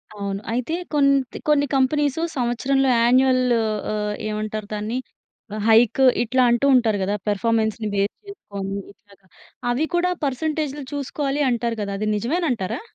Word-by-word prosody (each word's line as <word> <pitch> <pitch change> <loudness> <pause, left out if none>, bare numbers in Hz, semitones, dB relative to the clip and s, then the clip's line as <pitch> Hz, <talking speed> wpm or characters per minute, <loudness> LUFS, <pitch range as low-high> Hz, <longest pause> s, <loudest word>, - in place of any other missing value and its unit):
అవును. 200 -1 -4
అయితే 250 +6 -2 0.2
కొంత్ 275 -3 +2
కొన్ని 285 -1 +4
కంపెనీసు 285 +2 +1 0.2
సంవత్సరంలో 260 +3 +1
యాన్యుయల్ 255 +2 +4 0.5
ఆహ్, 210 0 -2
ఏమంటారు 215 0 -4
దాన్ని 210 +3 -3 0.6
ఆహ్, 215 - -4
హైక్ 225 +3 +5 0.2
ఇట్లా 255 +2 +2
అంటూ 240 +3 +2
ఉంటారు 225 -4 +3
గదా! 200 +2 0
పెర్ఫార్మన్స్‌ని 220 +1 0
బేస్ 200 +1 0
చేసుకొని 200 - -6 0.2
ఇట్లాగా, 200 -2 -24 0.5
అవి 265 +6 +1
కూడా 360 +1 +2
పర్సెంటేజ్‌‌లు 295 +1 -2
చూసుకోవాలి 285 0 -2
అంటారు 235 -1 -1
గదా! 200 -1 -3
అది 215 - -1
నిజమేనంటారా? 245 - -1
240 Hz, 130 wpm, -22 LUFS, 210-275 Hz, 0.6 s, హైక్